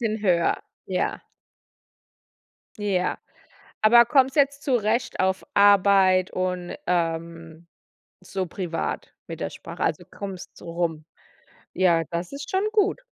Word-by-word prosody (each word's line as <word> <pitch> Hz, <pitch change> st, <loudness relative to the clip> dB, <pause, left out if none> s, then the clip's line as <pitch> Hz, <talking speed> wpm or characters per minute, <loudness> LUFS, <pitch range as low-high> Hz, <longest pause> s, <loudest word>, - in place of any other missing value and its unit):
bisschen 220 Hz, -2 st, -2 dB
höher, 175 Hz, -4 st, +2 dB, 0.3 s
ja. -, -, -1 dB, 1.6 s
Ja. 190 Hz, -3 st, 0 dB, 0.6 s
Aber 235 Hz, +2 st, +7 dB
kommst 265 Hz, +2 st, +3 dB
du -, -, +3 dB
jetzt 280 Hz, 0 st, +2 dB
zurecht 235 Hz, -2 st, 0 dB
auf 190 Hz, 0 st, +1 dB
Arbeit 195 Hz, -2 st, +5 dB
und, 180 Hz, -1 st, -3 dB
ähm, 165 Hz, -1 st, -3 dB, 0.6 s
so 185 Hz, 0 st, -3 dB
privat 170 Hz, -1 st, -4 dB
mit -, -, -7 dB
der -, -, -2 dB
Sprache? -, -, -7 dB
Also, -, -, -1 dB
kommst 195 Hz, -3 st, -8 dB
so 170 Hz, -, -9 dB
rum? 165 Hz, -3 st, -2 dB, 0.7 s
Ja, 170 Hz, -3 st, +3 dB
das 170 Hz, +1 st, -3 dB
ist 285 Hz, +1 st, -7 dB
schon 380 Hz, +1 st, +1 dB
gut. 420 Hz, +3 st, +2 dB
185 Hz, 125 wpm, -24 LUFS, 170-220 Hz, 1.6 s, Aber